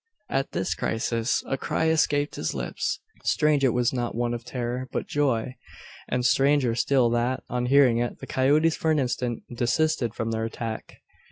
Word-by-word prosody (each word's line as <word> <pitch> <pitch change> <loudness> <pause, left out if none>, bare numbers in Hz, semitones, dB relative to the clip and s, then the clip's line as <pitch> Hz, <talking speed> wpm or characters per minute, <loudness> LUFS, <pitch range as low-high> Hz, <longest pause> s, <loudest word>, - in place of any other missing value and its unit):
At 135 0 -1
this 95 - -1
crisis 115 +1 -1
a 135 - -2
cry 160 - 0
escaped 145 -2 +2
his 80 - -3
lips. - - -2 0.2
Strange 150 -2 +2
it 130 - +5
was 125 +1 +1
not 120 -3 -2
one 120 0 0
of 120 0 -5
terror, 125 +1 -4
but - - -2
joy! 130 -4 0 0.6
And 125 -1 0
stranger 135 -2 +3
still 125 0 +2
that, 120 +2 0
on 125 0 -1
hearing 130 -3 +5
it, 120 0 -2
the - - -9
coyotes 150 +5 +2
for 160 - -1
an 155 - +3
instant 125 -3 -1
desisted 120 0 +1
from 115 0 -2
their 110 0 -1
attack! 115 0 -6
125 Hz, 175 wpm, -26 LUFS, 120-140 Hz, 0.6 s, it